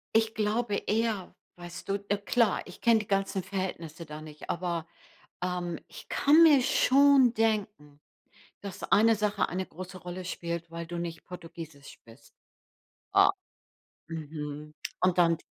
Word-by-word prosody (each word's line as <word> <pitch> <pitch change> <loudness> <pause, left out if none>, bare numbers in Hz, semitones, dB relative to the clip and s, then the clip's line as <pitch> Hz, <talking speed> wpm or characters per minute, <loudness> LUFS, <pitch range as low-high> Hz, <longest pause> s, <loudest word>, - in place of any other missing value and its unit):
Ich 225 0 +3
glaube 215 0 0
eher, 215 -3 -1 0.2
weißt 175 -1 -9
du? 195 - 0 0.2
Äh, 205 - +2
klar, 210 +1 +2
ich 180 - -12
kenne 230 -2 +5
die 210 - -6
ganzen 195 -1 0
Verhältnisse 175 -4 -5
da 150 0 -8
nicht, 155 -1 -11
aber, 170 -2 -2 0.6
ähm, 180 -2 -2
ich - - -12
kann 305 +4 +6
mir 295 -5 +7
schon 270 -1 +5
denken, 205 -10 -1 0.6
dass 200 -2 -7
eine 225 +1 +6
Sache 210 0 0
eine 185 +1 -3
große 185 +2 -9
Rolle 180 +1 -7
spielt, 170 -2 -4
weil 170 0 -6
du 175 +1 -5
nicht 170 -1 -5
Portugiesisch 165 -5 -10
bist. 115 +2 -18 0.8
O - - +7 0.8
mhm. 150 -2 -6 0.3
Und 185 -1 +3
dann 170 -2 +4
180 Hz, 145 wpm, -29 LUFS, 165-210 Hz, 0.8 s, mir